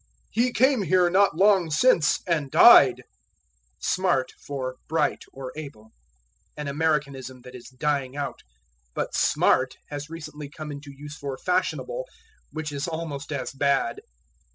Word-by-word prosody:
"He 245 +3 +1
came 260 +1 +3
here 180 -1 +3
not 195 -3 +4
long 190 -3 +4
since 160 -1 +3
and 155 -6 0
died." 135 - +7 0.8
Smart 175 -9 0
for 130 -2 -5
Bright, 160 - 0
or 130 -1 -8
Able. 140 -8 -10 0.7
An 150 -1 -5
Americanism 140 -4 -2
that 125 0 -12
is 125 -1 -11
dying 140 0 -2
out. 145 - -4 0.5
But - - -3
"smart" 130 0 +2
has 145 +1 -6
recently 150 -3 -8
come 150 0 -8
into 145 0 -9
use 145 +2 -10
for 140 -2 -6
fashionable, 330 - -2 0.4
which 155 -1 -5
is 140 +2 -3
almost 160 -4 -5
as 130 -4 -3
bad. 140 -3 0
150 Hz, 135 wpm, -25 LUFS, 135-170 Hz, 0.8 s, died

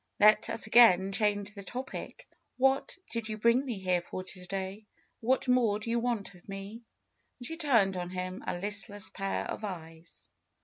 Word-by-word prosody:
Let 215 +1 +6
us - - -1
again 215 -4 +6
change 205 0 0
the 200 - -8
topic. 250 +7 -7 0.3
What 270 +7 +2
did 230 -1 -2
you 215 - -3
bring 235 +4 +4
me 245 -6 -3
here 185 -2 +1
for 185 +1 -6
to 185 -1 -8
day? 195 +2 -5 0.3
What 255 +3 +1
more 245 -5 +3
do 220 +2 -4
you 235 - +2
want 230 -5 -1
of 180 +2 -18
me?" 195 +4 -7 0.6
And 245 - -7
she 325 - -3
turned 235 - +3
on 175 -1 -3
him 185 0 -5
a - - -1
listless 205 0 -3
pair 195 0 -2
of - - -5
eyes. 165 -4 -8
205 Hz, 180 wpm, -30 LUFS, 190-235 Hz, 0.6 s, Let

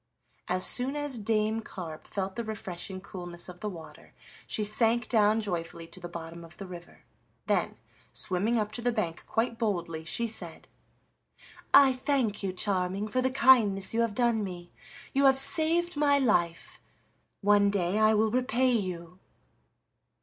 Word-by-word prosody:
As 185 +1 -1
soon 260 +3 +2
as 290 -2 -3
Dame 215 +1 0
Carp 165 -7 -9
felt 190 -1 -4
the 235 - -3
refreshing 190 -3 -6
coolness 175 -3 -6
of 180 -1 -11
the 210 - -3
water 160 -5 -12 0.3
she 215 - -1
sank 225 +2 +2
down 215 -1 +3
joyfully 170 -4 -4
to - - -10
the 175 -1 -8
bottom 170 0 -8
of 165 0 -14
the 195 - -7
river, 175 -2 -12 0.4
then, - - 0 0.3
swimming 205 +5 0
up 210 -1 -1
to 235 - -4
the 245 +1 +1
bank 180 -8 -3
quite 230 0 -1
boldly, 170 -7 -2
she 235 +8 -1
said: 175 -7 -6 1.0
"I 270 -2 +7
thank 255 -5 -1
you, 195 -2 -2
Charming, 190 +1 -2
for 255 +4 0
the 260 - +1
kindness 235 -8 +4
you 230 - +2
have 230 -3 -1
done 235 -3 +1
me. 175 -3 -7 0.4
You 275 0 +3
have 265 0 +5
saved 335 +5 +3
my 290 -1 +3
life; 175 -11 0 0.6
one 205 0 +4
day 195 0 0
I 215 0 +5
will 215 +1 +2
repay 255 +1 +1
you." 180 -5 -3
210 Hz, 160 wpm, -28 LUFS, 180-235 Hz, 1.0 s, I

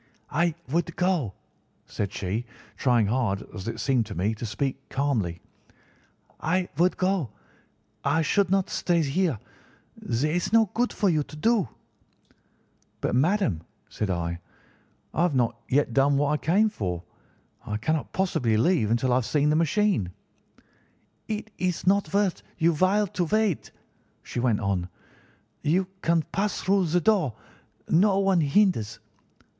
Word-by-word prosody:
"'I 170 0 +1
would 170 +2 -1
go,' 175 - 0 0.5
said 100 -2 -3
she, 100 +4 -3 0.3
trying 120 -4 +3
hard, 105 -3 0
as 95 -1 -7
it 115 - -4
seemed 125 -6 +1
to 100 - -7
me, 100 +6 0
to 110 +2 -5
speak 135 +5 -3
calmly; 115 -12 -1 1.0
'I 180 +3 0
would 180 +2 +3
go. 185 - 0 0.7
I 160 +4 +2
should 195 +5 +2
not 195 0 +2
stay 170 -2 +1
here. 155 - 0 0.6
There 135 +7 -1
is 175 +2 -1
no 225 -3 +4
good 245 +1 +1
for 205 - 0
you 160 -5 +3
to 150 - -8
do.' 215 - +2 1.3
"'But, - - -1
madam,' 140 - +2 0.3
said 105 - -3
I, 85 -1 -2 0.7
'I - - 0
have 175 -5 +2
not 120 -2 0
yet 135 -3 +2
done 140 +2 +3
what 145 0 +2
I 150 - +2
came 195 +9 +3
for. 90 - -4 0.6
I 105 - -3
cannot 155 +7 -1
possibly 125 - +1
leave 120 - +2
until 120 +3 +1
I - - +4
have 125 - 0
seen 150 0 +2
the - - +2
machine.' 165 - +2 1.2
"'It 220 0 -4
is 180 -2 -1
not 200 +2 +2
worth 200 -2 +1 0.2
your 170 0 +3
while 190 +6 +3
to 180 -2 -2
wait,' 215 -1 0 0.5
she - - -5
went 120 -3 +1
on. 95 -3 -1 0.7
'You 180 +5 +2 0.2
can 165 -1 +2
pass 205 +1 -1
through 190 -2 +2
the 175 +3 +2
door; 185 - +2 0.5
no 195 +4 +4
one 195 -3 +3
hinders. 145 - +2
155 Hz, 150 wpm, -26 LUFS, 115-185 Hz, 1.3 s, no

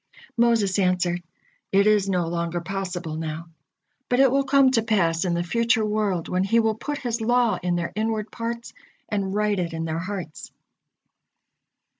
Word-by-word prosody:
Moses 230 -5 +2
answered: 180 -2 +1 0.5
"It 200 +1 +4
is 210 -2 +3
no 180 -3 +1
longer 170 0 -2
possible 180 -3 -4
now, 160 +1 -5 0.6
but 245 - +2
it 270 -2 +6
will 275 +1 +2
come 275 -1 +5
to 230 - +3
pass 190 -6 +1
in 175 -1 0
the 170 - 0
future 230 +3 +1
world, 210 -5 -1
when 185 +1 0
He 230 +4 +3
will 220 -1 +2
put 290 +7 -4
His 235 -4 -3
law 240 0 +2
in 180 0 0
their 170 -1 -2
inward 220 -1 -2
parts, 235 0 -5 0.4
and 200 -2 -2
write 210 -1 +1
it 170 -2 -2
in 165 0 -3
their 160 0 -2
hearts." 185 -3 -6
200 Hz, 170 wpm, -24 LUFS, 175-225 Hz, 0.6 s, it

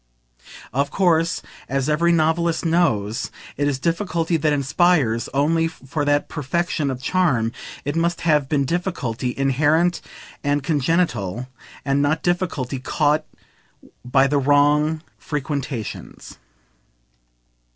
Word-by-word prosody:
Of 140 +3 +1
course, 165 -3 +1 0.3
as 135 0 0
every 165 +3 +2
novelist 165 +1 +1
knows, 115 - +1 0.3
it 145 - 0
is 140 -2 0
difficulty 170 +1 -1
that 155 -1 +1
inspires; 140 -4 +2
only, 165 +4 +2
for 145 -1 -4
that 145 0 +2
perfection 155 0 -1
of 130 -1 -5
charm, 130 -9 +1 0.3
it 145 +2 -2
must 170 +1 0
have 150 -4 +2
been 140 -2 +1
difficulty 135 - -2
inherent 150 +6 +2 0.4
and 145 -1 0
congenital, 130 - 0 0.4
and 140 0 +2
not 155 +3 +1
difficulty 165 -7 -1
"caught" 150 +3 +1 0.8
by 135 +2 +3
the 140 +1 +2
wrong 145 +3 +3 0.2
frequentations. 140 -5 -5
150 Hz, 110 wpm, -22 LUFS, 135-165 Hz, 0.8 s, by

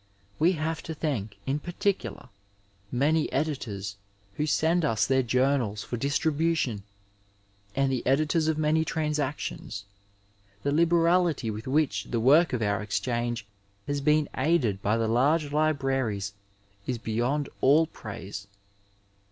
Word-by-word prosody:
We 170 +4 +4
have 160 -1 -2
to 160 - -3
thank, 115 -10 -3
in 140 +2 0
particular, 175 -4 -2 0.6
many 150 +5 +2
editors 110 -9 -3 0.4
who 150 +8 -1
send 165 +3 +2
us 115 -8 +2
their 130 0 +3
journals 125 -4 +1
for - - -4
distribution, 145 -2 0 0.9
and 135 0 +2
the 130 - -1
editors 155 +4 +2
of 160 -1 +1
many 155 +1 +2
Transactions. 150 -10 -3 0.8
The 140 - +1
liberality 170 -4 +3
with 110 +3 -7
which 150 +2 +1
the 120 - -2
work 150 +8 +5
of 120 -3 -1
our 100 -1 0
Exchange 120 +1 -2 0.4
has 145 0 -2
been 150 +1 +3
aided 130 - +1
by 105 +3 +1
the 115 -1 0
large 145 +6 +2
libraries 135 -10 0 0.5
is 125 - -1
beyond 120 +6 -1
aU 150 +5 +5
praise. 100 -7 -8
140 Hz, 125 wpm, -27 LUFS, 115-155 Hz, 0.9 s, work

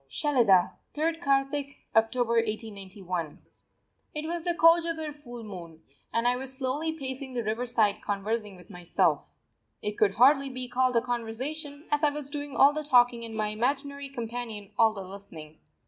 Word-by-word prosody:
SHELIDAH, 195 - +3 0.2
3_rd 325 +2 0
Kartik_ 280 0 0 0.2
(October) 225 +2 +2
1891. 195 -7 -3 0.8
It 300 +1 -3
was 335 +1 -3
the 345 -1 +1
Kojagar 330 -2 +3
full 245 -5 -10
moon, 170 -6 -9 0.3
and 230 +1 +1
I 245 0 +2
was 265 0 0
slowly 280 +4 -1
pacing 265 -3 -6
the 240 - -1
riverside 220 -1 +1
conversing 210 +1 -2
with 180 +2 -15
myself. 180 -2 0 0.5
It 210 0 -3
could 200 -2 +3
hardly 275 +3 +5
be 255 -1 -3
called 250 0 +1
a 235 - +4
conversation, 260 +6 -4
as 295 +1 +1
I 300 - +6
was 290 -1 -3
doing 290 -1 -5
all 280 +1 +6
the 305 - -2
talking 245 -4 +4
and 225 -1 -6
my 215 -1 0
imaginary 275 +5 -2
companion 230 -5 -5
all 225 -1 +5
the 205 -2 -7
listening. 175 -5 -10
245 Hz, 160 wpm, -28 LUFS, 215-285 Hz, 0.8 s, I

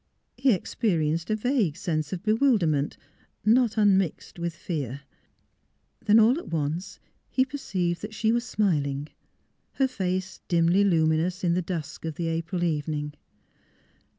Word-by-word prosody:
He 250 -5 +3
experi 170 -6 0
enced 165 +3 -3
a 215 - +2
vague 220 - 0
sense 155 -3 -2
of 185 0 -4
bewilderment, 215 - +2 0.5
not 230 0 +4
un 205 -3 +5
mixd 175 -1 -4
with 170 -1 -3
fear. 140 -6 -4 1.0
Then 215 0 +5
all 230 +7 +5
at - - -10
once 165 +4 -3 0.3
he 260 - +2
perceived 185 - -2
that 215 +1 -7
she 220 0 +2
was 235 +1 +1
smiling, 150 - 0 0.6
her 270 - +2
face 185 -5 -3
dimly 170 +3 +3
luminous 165 0 +2
in 170 -1 +2
the 180 - +1
dusk 165 -4 -5
of 160 -2 -3
the 165 0 -2
April 165 +2 -2
evening. 150 -2 -1
180 Hz, 145 wpm, -26 LUFS, 160-215 Hz, 1.0 s, un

